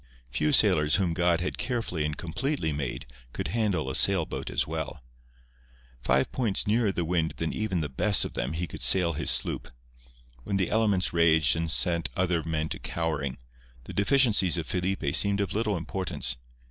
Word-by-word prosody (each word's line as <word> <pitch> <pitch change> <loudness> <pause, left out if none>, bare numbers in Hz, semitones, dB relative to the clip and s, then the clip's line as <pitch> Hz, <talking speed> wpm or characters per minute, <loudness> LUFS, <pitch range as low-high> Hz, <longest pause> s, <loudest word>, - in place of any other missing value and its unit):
Few 75 +4 0
sailors 75 0 +4
whom 90 -3 +1
God 85 0 +1
had 90 - -3
carefully 115 - -2
and 75 -1 -3
completely 85 - -2
made 70 -4 -4 0.3
could - - -4
handle 105 - 0
a 65 - -3
sailboat 95 -1 0
as - - 0
well. 65 - -5 1.0
Five 65 +2 +1
points 115 -7 -1
nearer 110 0 +2
the 85 -3 -2
wind 80 -1 -1
than 80 - -2
even 100 -6 -2
the 75 - -2
best 95 +9 +2
of - - -6
them 65 +5 -3
he 85 +2 -2
could - - -9
sail 90 -3 +5
his 75 0 -1
sloop. - - +1 0.8
When 100 - -2
the 95 -3 -1
elements 105 -6 +1
raged 80 -5 +4
and 80 0 -2
set 85 +1 +1
other 90 -3 +1
men 80 -1 -2
to - - -5
cowering, 75 -5 -3 0.5
the - - -9
deficiencies 100 -6 +2
of 85 - -3
Felipe 90 -1 -2
seemed 100 0 +3
of 100 - -1
little 105 -2 0
importance. 85 -7 -3
85 Hz, 175 wpm, -27 LUFS, 80-100 Hz, 1.0 s, sail